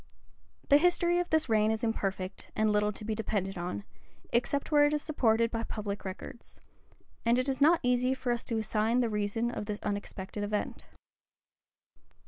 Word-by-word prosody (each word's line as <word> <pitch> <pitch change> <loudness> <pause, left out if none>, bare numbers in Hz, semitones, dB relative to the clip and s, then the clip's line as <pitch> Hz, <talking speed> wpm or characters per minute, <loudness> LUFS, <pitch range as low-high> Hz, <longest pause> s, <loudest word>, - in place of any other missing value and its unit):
The 285 - +7
history 350 +1 +3
of 355 - -2
this 315 -2 +2
reign 215 -2 +3
is 220 0 -1
imperfect, 195 -4 -2
and 215 0 +2
little 210 0 +2
to 210 - -7
be 220 - -1
depended 205 -3 -2
on, 180 +3 -4 0.5
except 275 +5 +1
where 295 -1 +6
it 290 - +2
is 295 - -3
supported 230 -6 +2
by 230 - -2
public 205 -3 -5
records; 200 +6 -8 0.6
and 235 +1 +3
it 255 +1 0
is 265 -1 -2
not 325 +4 +6
easy 250 +1 +2
for 255 -2 -2
us 240 -1 -1
to 230 - -1
assign 220 +2 +1
the 235 - +1
reason 210 +3 -1
of 210 - -5
this 210 -1 -4
unexpected 205 0 -4
event. 205 0 -3
225 Hz, 175 wpm, -30 LUFS, 210-255 Hz, 0.6 s, The